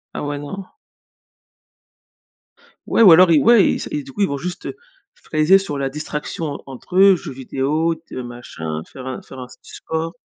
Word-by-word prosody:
Ah -, -, -3 dB
ouais, 145 Hz, 0 st, -3 dB
non. 145 Hz, +8 st, -7 dB, 2.2 s
Ouais -, -, +2 dB
ou 190 Hz, -7 st, +9 dB
alors 175 Hz, +1 st, +7 dB
i 155 Hz, -, +6 dB
ouais, 230 Hz, -3 st, +6 dB
il -, -, -1 dB
s -, -, -6 dB
et 295 Hz, -1 st, -3 dB
du 275 Hz, -, -12 dB
coup, 205 Hz, -5 st, -5 dB
ils 195 Hz, -, +4 dB
vont 140 Hz, -, -3 dB
juste 180 Hz, +4 st, -6 dB, 0.5 s
fraiser 155 Hz, +5 st, +3 dB
sur 190 Hz, -7 st, -4 dB
la 135 Hz, -1 st, -1 dB
distraction 150 Hz, +2 st, -5 dB
en 145 Hz, -1 st, -5 dB
entre 135 Hz, +7 st, -7 dB
eux, 195 Hz, 0 st, +7 dB
jeux 165 Hz, -, -7 dB
vidéo, 140 Hz, +5 st, -1 dB
te 165 Hz, -, -14 dB
machin, 120 Hz, -11 st, -6 dB
faire 130 Hz, +6 st, -12 dB
un 130 Hz, -, -5 dB
faire 130 Hz, -, -12 dB
un 125 Hz, -, -6 dB
du 125 Hz, -, -17 dB
sport. 160 Hz, +1 st, -4 dB
155 Hz, 195 wpm, -20 LUFS, 135-185 Hz, 2.2 s, ou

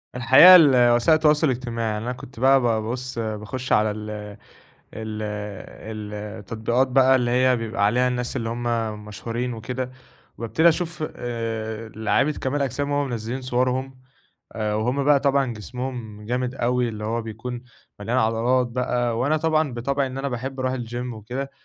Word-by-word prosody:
الحقيقة 130 Hz, +10 st, +9 dB
الوسائل 125 Hz, -2 st, +6 dB
التواصل 155 Hz, 0 st, +3 dB
الاجتماعي، 115 Hz, -4 st, -2 dB
إن 105 Hz, -, -5 dB
أنا 125 Hz, -, -2 dB
كنت 125 Hz, -1 st, -12 dB
بقى 135 Hz, +1 st, +5 dB
بابُص 120 Hz, +2 st, -2 dB
باخش 110 Hz, +3 st, -4 dB
على 105 Hz, 0 st, +3 dB
ال 105 Hz, 0 st, -6 dB, 0.9 s
ال 110 Hz, -1 st, -5 dB, 1.2 s
التطبيقات 115 Hz, +5 st, 0 dB
بقى 130 Hz, 0 st, +5 dB
اللي 120 Hz, -2 st, 0 dB
هي 130 Hz, 0 st, +3 dB
بيبقى 115 Hz, -2 st, -2 dB
عليها 125 Hz, +4 st, +2 dB
الناس 125 Hz, -1 st, -3 dB
اللي 115 Hz, -1 st, -2 dB
هُم 120 Hz, +1 st, -4 dB, 0.4 s
مشهورين 115 Hz, +4 st, -4 dB
وكده، 125 Hz, +3 st, -4 dB, 0.5 s
وأبتدي 155 Hz, +9 st, +3 dB
أشوف 165 Hz, -1 st, -1 dB
آآ 115 Hz, -2 st, -4 dB
لعيبة 110 Hz, +7 st, +1 dB
كمال 140 Hz, 0 st, -2 dB
أجسام 140 Hz, +2 st, -2 dB
وهُم 145 Hz, -1 st, 0 dB
منزلّين 120 Hz, +3 st, -4 dB
صوَرهم، 130 Hz, +1 st, -1 dB, 0.5 s
آآ 105 Hz, -1 st, -2 dB
وهُم 125 Hz, +6 st, 0 dB
بقى 145 Hz, -1 st, +5 dB
طبعًا 135 Hz, -3 st, +1 dB
جسمهم 115 Hz, -2 st, -6 dB
جامد 125 Hz, +2 st, -2 dB
أوي 125 Hz, -1 st, 0 dB
اللي 105 Hz, -2 st, -6 dB
هو 115 Hz, +2 st, -1 dB
بيكون، 120 Hz, +3 st, -6 dB, 0.4 s
مليان 115 Hz, +5 st, -1 dB
عضلات 120 Hz, +3 st, +2 dB
بقى 120 Hz, -1 st, -1 dB
وأنا 145 Hz, +5 st, +2 dB
طبعًا 155 Hz, -2 st, +1 dB
بطبعي 135 Hz, +3 st, -1 dB
إن 130 Hz, +1 st, -6 dB
أنا 140 Hz, -, -2 dB
باحب 130 Hz, +1 st, -5 dB
أروح 130 Hz, 0 st, 0 dB
الGym 120 Hz, 0 st, -5 dB
وكده، 125 Hz, +6 st, -5 dB
125 Hz, 150 wpm, -23 LUFS, 115-130 Hz, 1.2 s, الحقيقة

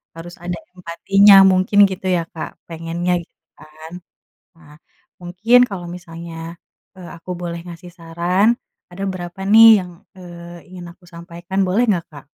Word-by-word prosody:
harus 175 Hz, +1 st, -11 dB
ada 175 Hz, 0 st, -4 dB, 0.2 s
empatinya 195 Hz, +3 st, +3 dB, 0.2 s
mungkin 185 Hz, +2 st, +1 dB
gitu 190 Hz, 0 st, -8 dB
ya 165 Hz, -, -2 dB
Kak, 160 Hz, -, -6 dB, 0.2 s
pengennya 165 Hz, +2 st, -3 dB
gitu 165 Hz, -, -32 dB
kan? 155 Hz, +2 st, -14 dB, 0.7 s
Nah, 150 Hz, -3 st, -18 dB, 0.5 s
mungkin 185 Hz, +8 st, +2 dB
kalau 180 Hz, -3 st, -7 dB
misalnya, 170 Hz, -1 st, -11 dB, 0.6 s
eee, 180 Hz, -2 st, -11 dB
aku 170 Hz, +2 st, -12 dB
boleh 170 Hz, -1 st, -6 dB
ngasih 175 Hz, +1 st, -11 dB
saran, 170 Hz, +5 st, 0 dB, 0.4 s
ada 180 Hz, +2 st, -9 dB
berapa 175 Hz, +1 st, -9 dB
nih 225 Hz, +1 st, +8 dB, 0.2 s
yang, 180 Hz, -, -12 dB, 0.3 s
eee, 175 Hz, -1 st, -12 dB
ingin 175 Hz, -1 st, -10 dB
aku 180 Hz, 0 st, -27 dB
sampaikan, 175 Hz, +3 st, -6 dB
boleh 205 Hz, +6 st, +1 dB
nggak 180 Hz, -5 st, 0 dB
Kak? 145 Hz, -, -13 dB
175 Hz, 145 wpm, -18 LUFS, 170-185 Hz, 0.7 s, nih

